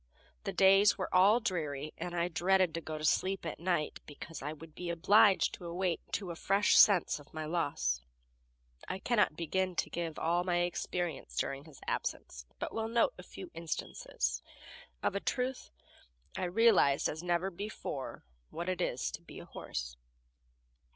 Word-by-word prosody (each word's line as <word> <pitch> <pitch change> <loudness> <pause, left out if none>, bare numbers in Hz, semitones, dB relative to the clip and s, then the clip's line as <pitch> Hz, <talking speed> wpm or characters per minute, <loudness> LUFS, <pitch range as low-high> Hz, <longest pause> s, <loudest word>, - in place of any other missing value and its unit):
The - - -1
days 195 +1 +5
were 185 - -4
all 195 +6 +6
dreary, 155 - -3
and 175 0 -5
I 170 0 +1
dreaded 180 +1 +2
to 165 - -3
go 155 0 -5
to 155 - -4
sleep 190 +3 +1
at 165 - -4
night, 170 -3 -1
because 155 +2 -8
I 145 +2 -3
would 155 +1 -11
be 180 +1 -5
obliged 185 +1 +5
to 175 - -8
awake 175 0 -1
to 185 -2 -2
a - - -6
fresh 200 +4 +3
sense 190 -7 +6
of 145 +2 -17
my 155 0 -3
loss. 155 - 0 0.9
I - - -3
cannot 210 -5 +2
begin 185 +2 -1
to - - -1
give 165 -2 -3
all 175 +2 +1
my 175 -1 +1
experience 175 -2 -3
during 140 +1 -2
his 155 -4 -15
absence, 65 - -4
but - - -4
will 225 0 -1
note 235 - +2
a - - -6
few 365 -3 -10
instances. 165 -1 -3 0.6
Of - - +1
a 200 - -1
truth, 255 +4 -2 0.7
I - - -1
realized 185 -7 +4
as 155 - -4
never 175 +2 0
before 175 -8 -6 0.2
what 170 +2 -4
it 185 - -1
is - - -1
to - - -7
be - - -12
a - - -9
horse. 60 0 -6
175 Hz, 170 wpm, -32 LUFS, 160-190 Hz, 0.9 s, all